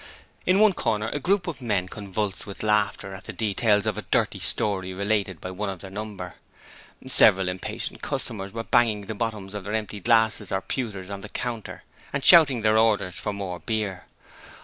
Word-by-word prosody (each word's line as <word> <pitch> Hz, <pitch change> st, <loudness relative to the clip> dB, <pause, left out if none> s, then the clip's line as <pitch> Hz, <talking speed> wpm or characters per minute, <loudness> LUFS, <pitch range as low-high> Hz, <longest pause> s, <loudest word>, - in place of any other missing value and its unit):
In 185 Hz, -, +5 dB
one 215 Hz, -2 st, +6 dB
corner 110 Hz, -8 st, -1 dB
a 145 Hz, -, -3 dB
group 185 Hz, +5 st, +1 dB
of 170 Hz, -6 st, -5 dB
men 100 Hz, -6 st, 0 dB
convulsed 100 Hz, 0 st, -4 dB
with 100 Hz, -, -7 dB
laughter 105 Hz, -2 st, +1 dB
at 95 Hz, +2 st, -9 dB
the -, -, -6 dB
details 105 Hz, -1 st, +2 dB
of 105 Hz, -1 st, -1 dB
a 105 Hz, -, -9 dB
dirty -, -, +1 dB
story 95 Hz, -3 st, -1 dB
related 100 Hz, -3 st, -1 dB
by 90 Hz, -, -6 dB
one 100 Hz, +2 st, -3 dB
of 95 Hz, -3 st, -6 dB
their 95 Hz, -, -9 dB
number. 100 Hz, -4 st, -6 dB, 0.7 s
Several 95 Hz, 0 st, +5 dB
impatient 90 Hz, 0 st, -5 dB
customers 100 Hz, -3 st, -3 dB
were 115 Hz, +2 st, -4 dB
banging 115 Hz, -3 st, +3 dB
the 105 Hz, +2 st, -6 dB
bottoms 105 Hz, -3 st, -4 dB
of 105 Hz, -2 st, -5 dB
their 105 Hz, +2 st, -5 dB
empty 105 Hz, -1 st, -3 dB
glasses 110 Hz, -1 st, +2 dB
or 95 Hz, -, 0 dB
pewters 100 Hz, -7 st, -4 dB
on 100 Hz, 0 st, -5 dB
the 105 Hz, -, -9 dB
counter 115 Hz, -2 st, -5 dB, 0.3 s
and 140 Hz, -1 st, -3 dB
shouting 145 Hz, -, +7 dB
their 110 Hz, 0 st, +4 dB
orders 105 Hz, -5 st, +2 dB
for 105 Hz, -, -3 dB
more 95 Hz, -3 st, -5 dB
beer. 105 Hz, -5 st, -3 dB
105 Hz, 190 wpm, -25 LUFS, 95-110 Hz, 0.7 s, shouting